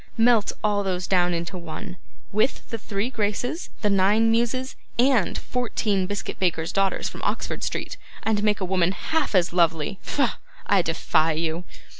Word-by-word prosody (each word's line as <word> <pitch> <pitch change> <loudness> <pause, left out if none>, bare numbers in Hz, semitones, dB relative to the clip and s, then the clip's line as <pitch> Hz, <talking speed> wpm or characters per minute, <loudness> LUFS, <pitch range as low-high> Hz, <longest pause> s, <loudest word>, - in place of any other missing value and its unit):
Melt 225 -2 +4
all 205 -1 +2
these 180 -2 -1
down 180 -2 +3
into 170 +2 -3
one, 175 +3 -7 0.4
with 215 +6 0
the 230 - -3
three 205 +4 -2
Graces, 235 - -2
the 210 - +3
nine 205 +4 +4
Muses, 240 +3 0 0.2
and 245 -5 +3
fourteen 210 -6 -1
biscuit 205 0 -4
bakers' 170 -2 0
daughters 195 -1 +1
from - - -8
Oxford - - -2
Street, - - -3 0.3
and 215 -2 +1
make 210 0 +2
a 190 - -1
woman 185 0 +2
half 315 - -1
as 175 -2 +3
lovely. 170 +2 +2
Pho! 280 -3 +1 0.4
I 200 -2 +4
defy 160 -1 +1
you. 165 +2 -2
200 Hz, 160 wpm, -24 LUFS, 180-225 Hz, 0.4 s, Melt